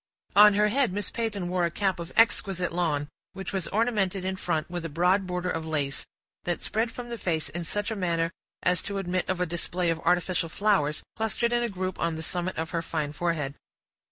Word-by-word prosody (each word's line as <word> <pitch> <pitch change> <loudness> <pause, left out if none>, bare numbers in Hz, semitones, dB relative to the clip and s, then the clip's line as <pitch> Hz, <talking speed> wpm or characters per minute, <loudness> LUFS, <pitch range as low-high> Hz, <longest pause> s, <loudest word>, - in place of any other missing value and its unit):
On 210 0 +9
her 210 +1 +4
head 260 -1 +2
Miss 200 +1 -3
Peyton 215 -6 -2
wore 180 0 +1
a 170 - +3
cap 190 +2 0
of 170 +1 -6
exquisite 195 -6 +3
lawn, 155 -5 0 0.3
which 195 0 -6
was 190 -3 -1
ornamented 205 -4 +1
in 190 0 -1
front 165 -4 -1
with 175 -1 -4
a 165 - -3
broad 180 +5 +2
border 180 0 -1
of 165 - -2
lace, 145 -4 -1 0.4
that 175 -1 -1
spread 225 +2 -1
from 240 0 -7
the 235 -1 -5
face 160 -5 -1
in 170 +4 -4
such 205 +6 -2
a - - -1
manner 170 -4 0 0.3
as 180 0 +3
to 200 - -3
admit 185 -1 -1
of 185 -1 0
a 180 - +2
display 170 +1 -1
of 165 - -2
artificial 175 0 +1
flowers, 160 -6 +1
clustered 230 +2 0
in 240 - +3
a 240 - 0
group 185 -2 -3
on 170 -1 0
the 160 - -5
summit 180 +2 -2
of 160 0 -2
her 170 -2 0
fine 155 -3 -2
forehead. 150 -4 -1
180 Hz, 215 wpm, -28 LUFS, 165-200 Hz, 0.4 s, On